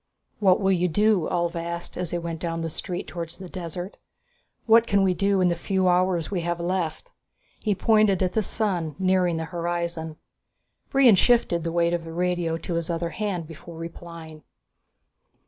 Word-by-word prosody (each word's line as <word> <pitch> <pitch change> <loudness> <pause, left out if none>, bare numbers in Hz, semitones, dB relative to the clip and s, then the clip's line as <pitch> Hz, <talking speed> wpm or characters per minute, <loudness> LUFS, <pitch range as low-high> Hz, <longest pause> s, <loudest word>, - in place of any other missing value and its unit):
"What 190 -3 +4
will 195 -1 +2
you 180 -1 +2
do?" 205 +1 +2
Ulv 170 -1 0
asked 170 0 -5
as 180 -2 -3
they 175 - -2
went 170 -1 -4
down 165 -1 -3
the 165 -1 -3
street 180 +2 -5
towards 170 -1 -6
the 185 - -8
desert. 175 +1 -6 0.7
"What 230 0 +6
can 200 -1 +3
we 185 -1 +3
do 200 +1 +1
in 180 - +4
the 170 - +1
few 190 +2 0
hours 180 -1 +2
we 185 -3 -1
have 170 0 -2
left?" 180 - -2 0.5
He 210 -3 0
pointed 215 -2 +3
at 185 - 0
the 220 - +2
sun, 180 -7 -2
nearing 185 -2 +2
the 160 - -3
horizon. 170 -2 -3 0.7
Brion 270 -4 +6
shifted 190 -4 +3
the 165 - -2
weight 170 0 +2
of 170 -1 -1
the 165 0 -8
radio 175 -1 0
to 170 - -5
his 170 0 -2
other 170 0 -1
hand 200 -6 -3
before 165 +1 -11
replying. 165 -1 -9
175 Hz, 180 wpm, -25 LUFS, 170-190 Hz, 0.7 s, What